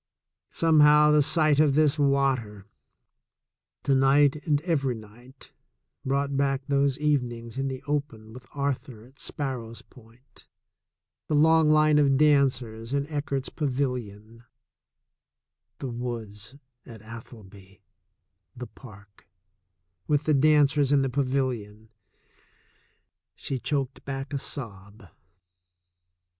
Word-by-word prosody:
Somehow 150 -2 +5
the 150 0 +5
sight 155 0 +2
of 150 -3 +3
this 150 0 +2
water, 135 -8 0 1.2
to 140 - +1
night 135 +2 +4
and 145 -2 +2
every 140 -7 -1
night, 120 +5 -15 0.5
brought 140 +1 -1
back 135 0 0
those 140 -1 +1
evenings 125 -5 -2
in 135 - -1
the 130 -1 -6
open 140 -7 -4
with 125 +1 -13
Arthur 140 -5 -4
at 130 +2 -21
Sparrows 125 -5 -5
Point, 120 +1 -20 0.8
the 150 - 0
long 160 +1 +4
line 155 0 +4
of 140 -2 +3
dancers 130 -6 +1
in 140 0 0
Eckert's 140 -2 -3
Pa 150 - -4
vilion, 115 -4 -4 1.3
the 130 - -5
woods 115 -1 -7 0.3
at 110 -3 -13
Atholby, 105 -4 -13 0.7
the 125 - -7
park, 100 -6 -16 0.8
with 145 0 +1
the 155 - +1
danc 150 0 +4
ers 140 -1 +2
in 140 -1 +3
the 135 - -1
pavilion 125 -5 -3 0.7
— - - -41
^he 130 -3 -5
choked 140 -3 -2
back 135 +1 -6
a 140 - -1
sob. 100 - -8
135 Hz, 115 wpm, -26 LUFS, 115-145 Hz, 1.3 s, Somehow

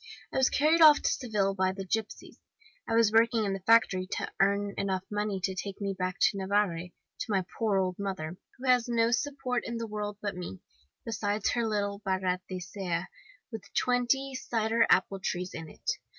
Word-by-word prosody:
'I - - -1
was 265 -1 +4
carried 315 +3 +3
off 305 -2 +9
to - - 0
Seville 210 -6 0
by 190 -1 +1
the 195 0 -6
gipsies. 215 +3 -4 0.5
I 225 - +1
was 230 -2 +4
working 230 0 +4
in 195 - -1
the 195 - -3
factory 190 -2 +3
to - - -3
earn 200 +1 +2
enough 190 -2 -1
money 210 -1 -1
to 190 +1 -1
take 195 +1 -5
me 200 -1 -2
back 185 -1 -2
to 200 - +4
Navarre, 190 -3 0 0.3
to - - -2
my 190 -3 +1
poor 215 -4 +2
old 185 -1 -1
mother, 185 -5 -4 0.2
who 260 +1 -6
has 250 -1 +4
no 230 -1 +2
support 255 0 -1
in 235 - -4
the 230 - -3
world 210 -1 -4
but 200 -2 -3
me, 175 - -7 0.5
besides 210 -2 -1
her 235 -2 0
little 200 -2 -1
barratcea* 185 -1 -2 0.5
with 225 -2 -5
twenty 250 +2 +1
cider 230 -2 +1
apple 195 - +3
trees 180 -1 -3
in 160 -1 -7
it. - - -18
205 Hz, 185 wpm, -29 LUFS, 190-230 Hz, 0.5 s, off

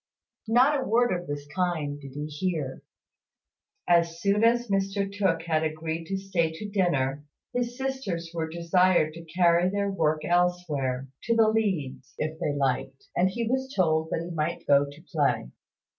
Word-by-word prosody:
Not 260 +5 +4
a - - -2
word 240 0 +2
of 175 0 -4
this 145 0 -4
kind 160 -6 -1
did 135 -2 -10
he 145 +1 -4
hear. 155 -3 -3 1.1
As 170 -1 +3
soon 200 +3 +2
as 240 +1 +3
Mr 195 0 0
Tooke 195 -5 0
had 160 -2 +1
agreed 160 +1 -3
to 195 - -2
stay 185 -4 0
to 210 +6 -6
dinner, 145 -9 0 0.3
his 245 0 -2
sisters 260 -12 -3
were 160 -1 -2
desired 170 -1 +2
to 165 +1 -9
carry 175 +1 +3
their 200 0 -1
work 155 -4 0
elsewhere, 170 -7 0 0.2
to 230 - +2
the 225 -1 +5
leads, 150 -12 -1
if 155 +1 -3
they 160 - 0
liked; 135 -1 -2
and 185 +2 +3
he 230 +3 -3
was 265 +2 -1
told 160 -3 +2
that 165 - -2
he - - -7
might 155 +1 -2
go 140 0 +4
to 145 +3 -13
play. 145 - +1
170 Hz, 170 wpm, -27 LUFS, 155-200 Hz, 1.1 s, the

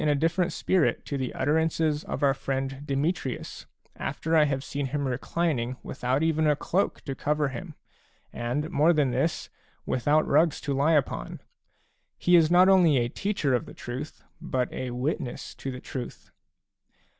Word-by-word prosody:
a 145 - +3
different 165 +4 +1
spirit 185 -4 +1
to 145 - -4
the 130 -2 -2
utterances 155 +1 +1
of - - -4
our 140 -1 +5
friend 135 0 -3
Demetrius, 140 -1 -2 0.3
after 165 +1 -2
I 155 -2 +6
have 135 -2 -1
seen 140 -1 -3
him 140 +1 -2
reclining 130 -1 -1
without 130 +3 -1
even 160 -1 +2
a 150 - +4
cloak 185 +6 -1
to 135 - -5
cover 150 +1 0
him, 160 +3 -7 0.6
and, 130 +8 -2
more 160 +2 +4
than 145 -5 +2
this, 135 +7 -1 0.3
with 125 +1 -2
out 155 +1 +4
rugs 155 +2 +3
to 140 - -2
lie 140 +4 +3
upon. 145 -4 -1 0.8
He 175 - +4
is 165 -2 +5
not 180 +2 +6
only 180 -7 +5
a 120 -1 +1
teacher 195 -5 -1
of 125 - 0
the - - -11
truth, 130 +5 -7 0.2
but 125 -1 -2
a 130 - -4
witness 125 +2 -3
to 135 - -6
the 130 -1 -6
truth. 130 -1 -7
145 Hz, 170 wpm, -27 LUFS, 130-160 Hz, 0.8 s, I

